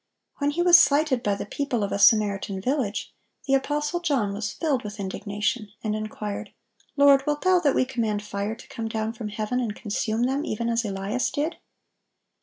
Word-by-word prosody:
When 285 0 +1
He 340 +4 0
was 350 -1 +9
slighted 280 -3 +3
by 205 -4 0
the - - -5
people 250 0 -2
of 200 - -2
a 200 - -1
Samaritan 200 -3 +3
village, 245 -1 -2 0.3
the 270 - 0
apostle 295 +4 0
John 270 -12 0
was 210 +1 -3
filled 285 -6 -1
with 210 0 -7
indignation, 205 +3 -2
and 215 -1 -1
inquired, 215 -1 -5 0.5
"Lord, 280 -1 +6
wilt 295 0 -1
Thou 370 -1 +5
that 290 -5 +2
we - - +3
command 225 -5 -2
fire 205 +1 -3
to - - -14
come 225 -1 -5
down 220 0 -2
from 220 -2 -6
heaven, 215 +3 -2
and 225 -4 -2
consume 220 +1 -2
them, 270 +4 0
even 235 -5 -2
as 230 0 +1
Elias 210 +5 -2
did?" 305 +4 -2
230 Hz, 190 wpm, -25 LUFS, 210-280 Hz, 0.5 s, was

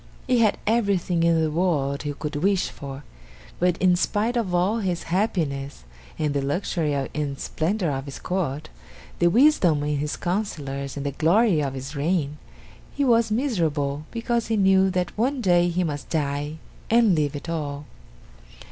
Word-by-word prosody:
He 250 -2 +2
had 215 -3 +3
everything 200 -6 +1
in 165 -1 +3
the 155 - 0
world 150 -5 0
he 145 0 -3
could 150 +1 -5
wish 190 +4 +1
for, 140 0 -8 0.6
but 180 0 +2
in 185 -1 +4
spite 215 +6 0
of 225 -6 0
all 185 +6 +1
his 180 -5 -2
happiness, 145 - -1 0.3
and 150 -2 0
the 140 - 0
luxury 150 +1 -1
and 140 0 -3
splendor 175 +1 -1
of 135 0 -3
his 140 - -7
court, 155 -5 -3 0.5
the 175 - +4
wisdom 200 - +4
of 150 - -1
his 150 +1 -2
councilors 145 -8 -3
and 140 - -4
the 140 - -1
glory 170 - +3
of 135 -2 -2
his 135 +3 -6
reign, 150 -1 -1 0.6
he 285 - +1
was 230 -2 +3
miserable 155 - 0
because 235 0 -1
he 225 0 0
knew 190 -1 +4
that 180 -1 -2
one 260 +5 0
day 175 -5 +3
he 180 +1 0
must 145 -4 -4
die 145 -1 -1 0.4
and 230 -3 +5
leave 150 -3 0
it 145 - -7
all. 145 -3 -4
170 Hz, 165 wpm, -24 LUFS, 145-200 Hz, 0.6 s, and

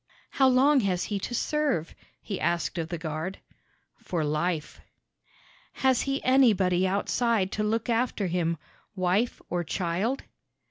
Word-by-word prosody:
"How 265 - +4
long 265 +3 +5
has 190 -6 0
he 205 -2 -2
to 240 - -4
serve?" 290 - 0 0.3
he 200 - -4
asked 170 +1 0
of 160 0 -3
the 170 - -3
guard. 160 +3 -4 0.6
"For 170 -3 -2
life." 155 +1 -2 0.9
"Has 260 -2 +2
he 275 0 -2
anybody 200 -9 +4
outside 200 +1 +1
to 210 - -1
look 225 +1 0
after 230 -3 0
him 170 -2 0 0.4
wife 190 +5 0
or 175 0 -1
child?" 185 - -1
195 Hz, 135 wpm, -27 LUFS, 175-245 Hz, 0.9 s, long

